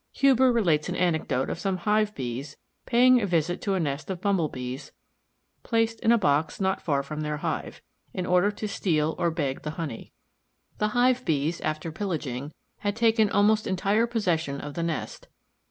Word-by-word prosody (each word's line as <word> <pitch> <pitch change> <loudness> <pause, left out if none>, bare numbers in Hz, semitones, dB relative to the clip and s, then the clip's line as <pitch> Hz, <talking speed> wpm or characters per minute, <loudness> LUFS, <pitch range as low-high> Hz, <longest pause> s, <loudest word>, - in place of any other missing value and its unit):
Huber 265 -2 +4
relates 175 -10 +2
an 180 - -2
anecdote 160 -7 0
of - - -4
some 195 -3 -1
Hive 210 +3 +1
bees 130 +2 -5 0.3
paying 250 +1 +5
a 200 - 0
visit 175 0 0
to 200 -2 0
a - - 0
nest 145 -1 -3
of 185 -2 -3
Bumble 190 -5 +1
bees, 130 +3 -7 0.7
placed 225 -1 0
in 225 - +3
a 235 - +6
box 150 -5 +1
not 190 -1 0
far 140 -4 0
from 155 +2 -5
their 150 0 -2
hive, - - -4 0.3
in 180 - -3
order 180 +3 +3
to 210 +1 -5
steal 160 -6 0
or 170 - +2
beg 145 -5 -2
the 150 - -4
honey. 150 -9 -5 0.7
The 210 - +2
Hive 255 +1 +3
bees, 160 - 0
after 155 +1 -3
pillaging, 150 -7 -4 0.3
had 205 0 -2
taken 225 -2 +3
almost 210 +2 +3
entire 200 +5 +1
possession 165 -11 -1
of 145 0 -7
the 170 - -3
nest. 165 -2 -4
175 Hz, 180 wpm, -26 LUFS, 150-210 Hz, 0.7 s, a